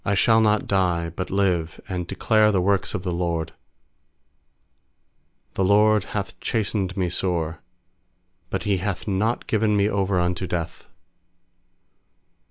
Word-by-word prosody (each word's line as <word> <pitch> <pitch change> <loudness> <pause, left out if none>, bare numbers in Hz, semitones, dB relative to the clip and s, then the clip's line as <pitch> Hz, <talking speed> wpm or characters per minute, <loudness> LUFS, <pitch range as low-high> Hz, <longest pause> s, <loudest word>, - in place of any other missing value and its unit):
17I 100 0 0
shall 110 +4 +4
not 105 -1 +2
die, 90 -4 +1
but 90 - -4
live, 90 -5 0
And 90 -2 -4
declare 110 +3 +3
the 95 - +2
works 95 +1 +1
of 90 - -4
the 90 - -2
LORD. 85 -2 -2 2.0
18The 95 - +1
LORD 105 0 +4
hath 100 -2 -5
chastened 105 -4 -1
me 90 -2 +1
sore; 85 -2 -2 0.9
But 95 - -3
He 100 -2 +1
hath 95 +2 -4
not 105 +4 0
given 110 -1 +1
me 100 0 +3
over 100 -2 0
unto 90 +1 -1
death. 85 -2 -4
95 Hz, 135 wpm, -23 LUFS, 90-105 Hz, 2.0 s, shall